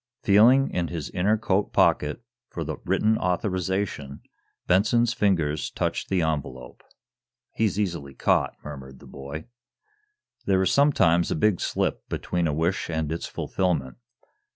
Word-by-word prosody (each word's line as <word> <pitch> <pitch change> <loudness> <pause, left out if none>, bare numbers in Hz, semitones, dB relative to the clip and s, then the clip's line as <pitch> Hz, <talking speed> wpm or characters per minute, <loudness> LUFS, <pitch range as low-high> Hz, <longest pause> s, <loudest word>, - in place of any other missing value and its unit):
Feeling 120 +7 +5
in 85 -1 -1
his 80 -4 -5
inner 100 +5 +1
coat 100 -2 0
pocket 75 +10 +2 0.3
for 85 - -5
the 80 0 -5
written 105 +4 +2
authorization, 90 -5 -2 0.4
Benson's 110 +6 +3
fingers 80 -9 0
touched - - -3
the 95 -3 +1
envelope. 70 -5 -4 0.7
"He's 105 -3 0
easily 85 -9 -3
caught;" - - +1
murmured 65 -3 -9
the - - -16
boy. 70 +3 -8 1.0
There 95 -1 +3
is 95 - +1
sometimes 85 - +3
a - - 0
big 95 +3 +2
slip - - -2
between 85 -2 -1
a - - 0
wish 85 +6 -1
and 80 -2 -2
its 85 - -3
fulfillment. 80 -9 -2
90 Hz, 135 wpm, -25 LUFS, 75-100 Hz, 1.0 s, Feeling